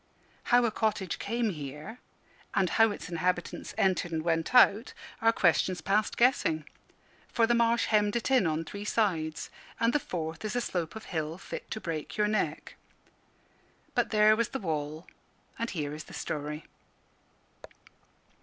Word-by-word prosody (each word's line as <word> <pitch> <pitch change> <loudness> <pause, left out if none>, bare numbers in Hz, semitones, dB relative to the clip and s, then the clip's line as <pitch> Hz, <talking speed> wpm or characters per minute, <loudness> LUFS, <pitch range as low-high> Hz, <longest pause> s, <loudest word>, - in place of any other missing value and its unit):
How 245 0 +4
a 230 - +1
cottage 210 -5 -1
came 230 +1 -1
here, 150 - -7 0.6
and 190 -3 +2
how 225 0 +5
its 205 - -6
inhabitants 175 +1 -2
entered 185 -2 +1
and 160 -1 -2
went 165 +6 0
out, 225 -1 +5 0.3
are 225 0 +5
questions 180 -2 +2
past 200 +6 0
guessing; 165 - +2 0.6
for 230 - +2
the 240 - +2
marsh 235 0 +3
hemmed 210 -1 +2
it 235 +2 -1
in 250 -9 +4
on 160 +1 -1
three 200 +5 -7
sides, 170 -8 -1 0.3
and 230 +1 +2
the 295 - +3
fourth 165 - -5
is 215 +2 -3
a 245 - +1
slope 175 -6 -3
of 220 - -8
hill 160 -1 -3
fit - - -8
to 220 - -4
break 165 -3 -5
your 210 0 +3
neck. 215 0 -2 1.2
But - - +1
there 215 -1 +5
was 235 0 0
the 270 - -3
wall, 155 -2 -3 0.5
and 230 0 -1
here 150 -4 -3
is 155 0 -7
the - - -11
story. 150 0 -4
195 Hz, 160 wpm, -29 LUFS, 160-225 Hz, 1.2 s, how